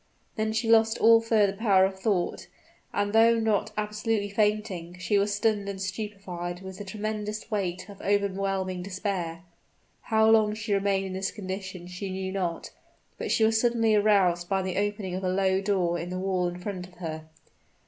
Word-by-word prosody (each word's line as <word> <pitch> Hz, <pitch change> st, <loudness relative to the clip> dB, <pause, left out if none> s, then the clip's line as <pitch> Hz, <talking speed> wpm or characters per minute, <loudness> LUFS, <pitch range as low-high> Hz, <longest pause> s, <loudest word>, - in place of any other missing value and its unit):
Then 220 Hz, 0 st, 0 dB
she 225 Hz, +1 st, -1 dB
lost 225 Hz, 0 st, +4 dB
all 225 Hz, 0 st, +6 dB
further 215 Hz, -3 st, +3 dB
power 195 Hz, -3 st, +4 dB
of 190 Hz, 0 st, -4 dB
thought; 190 Hz, -3 st, -1 dB, 0.4 s
and 205 Hz, 0 st, -1 dB
though 230 Hz, +1 st, +5 dB
not 220 Hz, -1 st, +1 dB
absolutely 210 Hz, 0 st, -1 dB
fainting, 200 Hz, -5 st, -1 dB
she 200 Hz, +3 st, +1 dB
was 205 Hz, +1 st, +1 dB
stunned 205 Hz, -1 st, 0 dB
and 195 Hz, -1 st, -5 dB
stupefied 190 Hz, -3 st, -5 dB
with 190 Hz, 0 st, -9 dB
the -, -, -5 dB
tremendous 215 Hz, +2 st, -4 dB
weight 185 Hz, -3 st, -2 dB
of 200 Hz, -1 st, -12 dB
overwhelming 195 Hz, -2 st, 0 dB
despair. 180 Hz, -3 st, -3 dB, 0.6 s
How 220 Hz, 0 st, +3 dB
long 215 Hz, -1 st, +4 dB
she 210 Hz, -1 st, -2 dB
remained 195 Hz, -1 st, +1 dB
in 190 Hz, -, -5 dB
this 190 Hz, +1 st, -1 dB
condition 190 Hz, -3 st, -6 dB
she 180 Hz, +2 st, -6 dB
knew 190 Hz, 0 st, -3 dB
not; 180 Hz, -4 st, -3 dB, 0.5 s
but -, -, -3 dB
she 225 Hz, -, +2 dB
was 220 Hz, 0 st, +3 dB
suddenly 230 Hz, -2 st, +2 dB
aroused 195 Hz, -5 st, +3 dB
by 195 Hz, -1 st, +1 dB
the 185 Hz, -1 st, -3 dB
opening 205 Hz, -2 st, -2 dB
of 185 Hz, +1 st, -3 dB
a 185 Hz, -, +1 dB
low 190 Hz, 0 st, +2 dB
door 185 Hz, -4 st, 0 dB
in 170 Hz, +2 st, -5 dB
the 180 Hz, -, -4 dB
wall 185 Hz, -1 st, 0 dB
in 175 Hz, 0 st, -5 dB
front 180 Hz, -1 st, -5 dB
of 180 Hz, -, -20 dB
her. 160 Hz, -2 st, -6 dB
195 Hz, 180 wpm, -27 LUFS, 185-215 Hz, 0.6 s, all